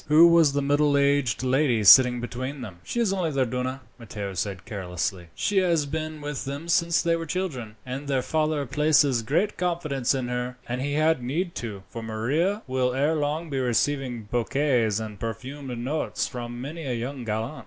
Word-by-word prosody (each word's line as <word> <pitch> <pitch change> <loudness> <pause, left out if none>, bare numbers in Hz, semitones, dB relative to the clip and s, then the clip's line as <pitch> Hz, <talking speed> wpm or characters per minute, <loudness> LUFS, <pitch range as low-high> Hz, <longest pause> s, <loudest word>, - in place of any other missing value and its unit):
"Who 155 +3 +7
was 165 -4 +5
the 140 0 0
middle 145 0 +3
aged 140 -4 +2
lady 130 -3 +2
sitting 125 +4 +8
between 130 +3 -5
them?" 100 -8 -8
"She 240 - -3
is 220 -5 +2
only 180 -4 0
their 135 -3 +1
duenna," 125 +2 -3 0.2
Matteo 105 -3 -6
said 95 +1 -4
carelessly. 90 -1 -4
"She 205 -1 +1
has 170 -5 +2
been 155 +1 -4
with 145 -2 -4
them 140 +5 -5
since 170 -1 +3
they 170 -1 +2
were 165 0 -4
children, 140 - -3
and 130 +3 -5
their 135 -2 0
father 155 -2 0
places 145 -2 +3
great 170 - 0
confidence 155 -8 0
in 130 -2 -2
her. 125 0 -3
And 125 +1 -3
he 145 +1 -2
had 155 -1 +2
need 165 +9 -2
to, 105 -5 -6
for 115 - -7
Maria 140 - -1
will 130 -1 0
ere 145 +4 +2
long 155 +1 -2
be 135 - -1
receiving 125 -1 0
bouquets 120 -1 +1
and 105 -3 -7
perfumed 125 +4 -5
notes 135 +6 -2
from 120 -1 -6
many 155 +6 -6
a 125 - -1
young 125 +3 -4
gallant." 110 +6 -3
135 Hz, 185 wpm, -25 LUFS, 120-155 Hz, 0.2 s, sitting